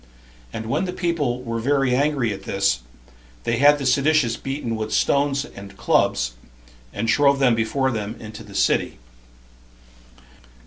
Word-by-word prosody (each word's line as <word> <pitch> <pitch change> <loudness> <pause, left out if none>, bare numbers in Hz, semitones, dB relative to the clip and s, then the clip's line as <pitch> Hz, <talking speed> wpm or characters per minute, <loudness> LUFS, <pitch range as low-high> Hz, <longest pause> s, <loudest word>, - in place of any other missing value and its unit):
And 110 - -5
when 115 +11 -1
the 180 - -4
people 150 -9 -1
were 115 -1 -3
very 135 +1 +1
angry 135 -5 +1
at 95 - -8
this, 95 -11 +1 0.6
they 115 - 0
had 145 +3 +6
the 140 - -5
seditious 140 -2 +3
beaten 135 -4 -4
with 110 0 -4
stones 140 0 +1
and 100 -5 -12
clubs, - - +1 0.6
and 115 +3 -3
drove 140 +3 +4
them 135 -3 +3
before 130 +4 0
them 110 -1 -4
into 110 0 -9
the 100 -2 -13
city. - - +1
125 Hz, 145 wpm, -22 LUFS, 110-140 Hz, 0.6 s, had